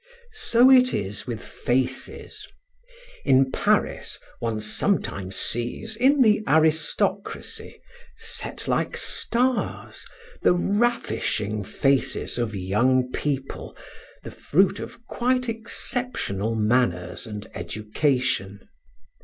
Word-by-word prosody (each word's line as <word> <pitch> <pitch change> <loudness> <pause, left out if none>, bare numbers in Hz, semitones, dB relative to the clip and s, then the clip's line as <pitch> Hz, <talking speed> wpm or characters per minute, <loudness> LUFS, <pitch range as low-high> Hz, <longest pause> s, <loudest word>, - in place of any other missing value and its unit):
So 245 +3 +6
it 255 -1 +6
is 100 +2 -4
with 115 -3 -4
faces. 130 +1 -3 0.8
In 130 -1 +4
Paris - - 0 0.2
one 115 -2 -2
sometimes 105 - -1
sees 120 - -2
in 265 +4 +4
the 215 -2 +4
aristocracy, 160 0 0 0.4
set 455 +1 -6
like - - 0
stars, 250 +1 -1 0.4
the 175 - +4
ravishing 115 - 0
faces 135 +2 0
of 115 -3 -1
young 125 +7 +2
people, 135 -2 -3 0.5
the - - -7
fruit 190 +5 +2
of 235 - -9
quite 250 +2 0
exceptional 225 - -2
manners 105 -5 0
and 105 -1 -6
education. 110 -3 -1
130 Hz, 95 wpm, -25 LUFS, -, 0.8 s, So